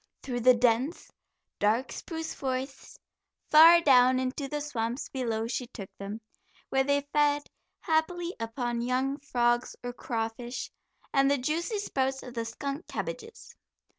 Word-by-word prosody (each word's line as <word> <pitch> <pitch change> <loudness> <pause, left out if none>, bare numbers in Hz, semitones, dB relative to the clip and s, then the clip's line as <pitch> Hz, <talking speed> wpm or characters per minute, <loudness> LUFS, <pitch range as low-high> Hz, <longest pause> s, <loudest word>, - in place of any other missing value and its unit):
Through 245 -2 -3
the 250 +1 +6
dense, 245 +6 +1 0.5
dark 225 +5 +1
spruce 320 -1 -5
forests, 265 0 -5 0.5
far 330 +3 +9
down 255 -3 +5
into 260 +2 -2
the 295 +2 -3
swamps 250 -3 -3
below 230 -4 -2
she 245 +1 -3
took 200 -5 -9
them, 200 +3 -6 0.5
where 270 0 +2
they 285 +1 0
fed 290 -1 +3 0.4
happily 340 +2 0
upon 235 +1 -2
young 260 +3 0
frogs 240 -3 0
or 245 0 -4
crawfish, 240 -1 -4 0.4
and 275 0 +4
the 285 - +3
juicy 320 - -1
sprouts 265 -9 -1
of 250 - -9
the 230 -2 -3
skunk 275 +7 -5
cabbages. 455 -1 -6
260 Hz, 135 wpm, -29 LUFS, 240-290 Hz, 0.5 s, far